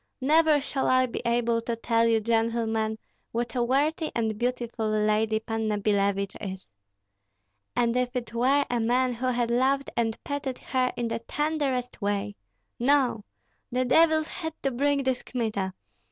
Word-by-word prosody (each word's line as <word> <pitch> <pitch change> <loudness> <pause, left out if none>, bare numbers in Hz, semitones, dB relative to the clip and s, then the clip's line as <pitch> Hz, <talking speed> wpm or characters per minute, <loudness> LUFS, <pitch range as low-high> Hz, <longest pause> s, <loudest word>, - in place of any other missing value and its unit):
Never 305 +2 +4
shall 275 -1 -2
I 255 0 +4
be 245 - -5
able 235 -1 +1
to 230 0 -3
tell 230 0 +2
you, 225 -1 +3
gentlemen, 225 -1 0 0.3
what 235 +1 -2
a 250 - 0
worthy 295 +6 +1
and 220 -2 0
beautiful 240 -1 -2
lady 215 +1 +2
Panna 220 -1 -2
Billevich 200 -1 0
is. 190 -2 -6 1.1
And 235 0 +2
if 250 0 0
it 235 -2 -4
were 270 +4 +3
a 240 - +1
man 250 +2 +2
who 250 +2 -3
had 240 -2 0
loved 270 +3 +1
and 225 -2 0
petted 285 -3 -3
her 255 -1 0
in 240 - -1
the 230 0 -2
tenderest 270 -2 -2
way 200 - -1 0.4
No! 250 -4 +2 0.5
the 255 +1 +1
devils 315 +3 +4
had 320 -2 -5
to 270 - +1
bring 280 +2 +1
this 260 -1 0
Kmita. 215 -6 -2
240 Hz, 155 wpm, -27 LUFS, 225-260 Hz, 1.1 s, Never